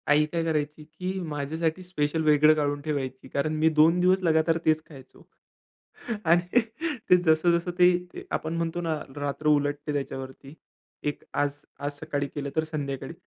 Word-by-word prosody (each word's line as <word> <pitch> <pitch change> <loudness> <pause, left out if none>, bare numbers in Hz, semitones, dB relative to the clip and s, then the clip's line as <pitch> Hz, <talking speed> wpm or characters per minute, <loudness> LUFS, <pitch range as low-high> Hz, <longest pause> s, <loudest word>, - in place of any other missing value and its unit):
आई 150 +1 +5
काय 165 +2 -2
करायची, 150 -1 -2
की 180 +5 -5
माझ्यासाठी 160 +2 -2
स्पेशल 160 -3 -1
वेगळं 150 0 +6
काढून 145 -1 -1
ठेवायची. 135 -3 -4
कारण 140 +3 -1
मी 155 +1 +3
2 160 +3 +4
दिवस 185 +1 +3
लगातार 160 0 +3
तेच 155 0 +3
खायचो. 135 -4 -15 1.0
आणि 175 +7 +4 0.5
ते 180 - +8
जसं, 170 0 +3
जसं 175 +1 -4
ते 180 0 +6 0.2
ते - - -8
आपण 160 +1 -2
म्हणतो 170 +1 -2
ना, 165 -2 -1 0.2
रात्र 145 +1 -3
उलटते 145 0 +1
त्याच्यावरती 135 0 -5 0.6
1 145 - -7
आज, 145 0 -1 0.2
आज 145 +1 -2
सकाळी 145 -1 -2
केलं 140 -1 -3
तर 160 - +2
संध्याकाळी. 140 -2 -4
155 Hz, 160 wpm, -27 LUFS, 145-165 Hz, 1.0 s, ते